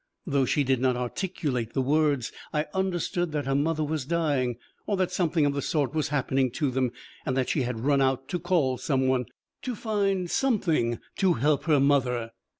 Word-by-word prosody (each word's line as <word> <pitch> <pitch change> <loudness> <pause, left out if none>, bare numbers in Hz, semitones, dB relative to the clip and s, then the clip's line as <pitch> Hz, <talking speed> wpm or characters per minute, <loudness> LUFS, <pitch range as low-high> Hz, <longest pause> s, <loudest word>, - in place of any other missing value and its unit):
Though 140 -6 +2
she 145 +3 +2
did 130 -2 +1
not 130 -1 +2
articulate 125 - -2
the 135 - +1
words, 145 -3 +1 0.2
I 150 0 0
understood 175 -2 -1
that 145 -2 -1
her 135 - 0
mother 155 +3 +1
was 155 -1 -2
dying, 140 -6 0 0.3
or 205 - 0
that 185 -1 0
something 165 -4 +1
of 145 - +1
the 140 - -2
sort 145 0 0
was 155 -3 0
happening 135 -2 +1
to 145 -5 0
them, 130 0 +1 0.3
and 130 - -1
that 130 - +1
she 150 - +1
had 120 -3 -3
run 140 -1 +3
out 135 0 +1
to 175 - -1
call 155 -8 +1
some 130 -2 +1
one, 130 -1 +1 0.4
to 250 -2 -3
find 200 -4 0
something 170 - +1 0.2
to 190 -3 +3
help 145 +3 +1
her 155 -4 +4
mother. 125 -5 +2
145 Hz, 195 wpm, -27 LUFS, 130-170 Hz, 0.4 s, her